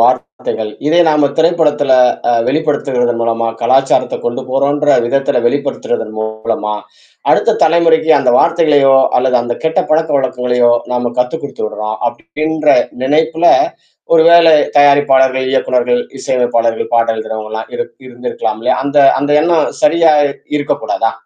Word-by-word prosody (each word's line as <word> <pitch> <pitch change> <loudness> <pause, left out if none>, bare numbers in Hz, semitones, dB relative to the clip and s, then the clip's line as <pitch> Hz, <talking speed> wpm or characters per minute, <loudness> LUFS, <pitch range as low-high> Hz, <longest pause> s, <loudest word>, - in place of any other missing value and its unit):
வார்த்தைகள், 115 -2 -1 0.2
இதை 165 +3 +3
நாம 150 -2 +2
திரைப்படத்துல 155 -4 +1 0.4
அ - - +2 0.2
வெளிப்படுத்துவதன் 135 -5 -1
மூலமா 115 0 -1
கலாச்சாரத்த 135 +3 +1
கொண்டு 120 +2 -3
போறோன்ற 145 +2 +1
விதத்துல 135 -1 0
வெளிப்படுத்துறதன் 120 -4 -3
மூலமா 110 -1 -4 0.6
அடுத்த - - +1
தலைமுறைக்கு 160 -1 +2
அந்த - - +1
வார்த்தைகளையோ! 150 -5 +3 0.2
அல்லது 125 0 +1
அந்த 120 0 -3
கெட்ட 160 0 0
பழக்க 160 +1 +1
வழக்கங்களையோ! 125 -2 0 0.2
நம்ம 125 -1 -2
கத்து 125 +5 -1
குடுத்துட்றோம். 110 -5 -5
அப்பிடின்ற 155 0 -5 0.4
நினைப்புல 160 +5 0 0.7
ஒருவேளை 165 0 +5 0.3
தயாரிப்பாளர்கள், 135 -2 +3
இயக்குனர்கள் 125 -2 0 0.2
இசை - - -4
அமைப்பாளர்கள் 115 -2 -1
பாடல் 115 -1 +1
எழுதுறவுங்கலாம் 110 0 -6
இரு 240 - -3 0.2
இருந்திருக்கலாம்ல. 120 -2 -5 0.2
அந்த 140 +1 0 0.2
அந்த 145 +1 -2
எண்ணம் 165 -1 +1
சரியா 160 +1 +3 0.2
இ - - -9 0.2
இருக்க 145 - -2
கூடாதா? 115 0 -1
135 Hz, 120 wpm, -13 LUFS, 120-155 Hz, 0.7 s, ஒருவேளை